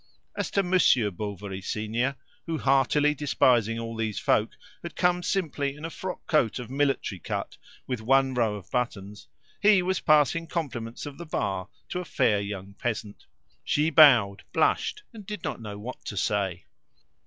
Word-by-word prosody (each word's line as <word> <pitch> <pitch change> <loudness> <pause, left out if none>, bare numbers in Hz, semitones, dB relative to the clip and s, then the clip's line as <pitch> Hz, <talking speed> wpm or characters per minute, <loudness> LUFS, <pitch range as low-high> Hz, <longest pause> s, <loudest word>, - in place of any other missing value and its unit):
As - - -2
to 200 - +1
Monsieur 170 - +3
Bovary 100 0 -6
senior, 110 +7 -1 0.3
who, 165 -1 -1
heartily 145 +2 +3
despising 125 -6 +2
all 115 0 -5
these 110 -3 -2
folk, 105 - +2 0.3
had 170 - -8
come 180 0 +2
simply 145 -7 -1
in 150 +2 -8
a 165 - -5
frock 185 +2 -6
coat 140 -9 +2
of 125 -1 -7
military 135 -8 0
cut - - -4 0.3
with 125 -4 -3
one 135 +3 +3
row 115 -4 +1
of 100 - -11
buttons 105 -4 -3 0.3
he 205 -3 +5
was 185 +1 0
passing 155 +2 +3
compliments 120 -9 -4
of 145 +1 -8
the 170 - -6
bar 95 - -2 0.2
to 180 - -3
a 180 - -5
fair 105 -9 +2
young 100 -1 -6
peasant. 110 -1 -5 0.4
She 150 +2 +1
bowed, 120 -11 +6
blushed, 425 - +1
and 220 -2 -10
did 210 -2 -7
not 140 -6 -4
know 105 -2 -7
what 120 +5 -8
to 100 - -5
say. 95 -3 -1
125 Hz, 165 wpm, -27 LUFS, 105-155 Hz, 0.4 s, bowed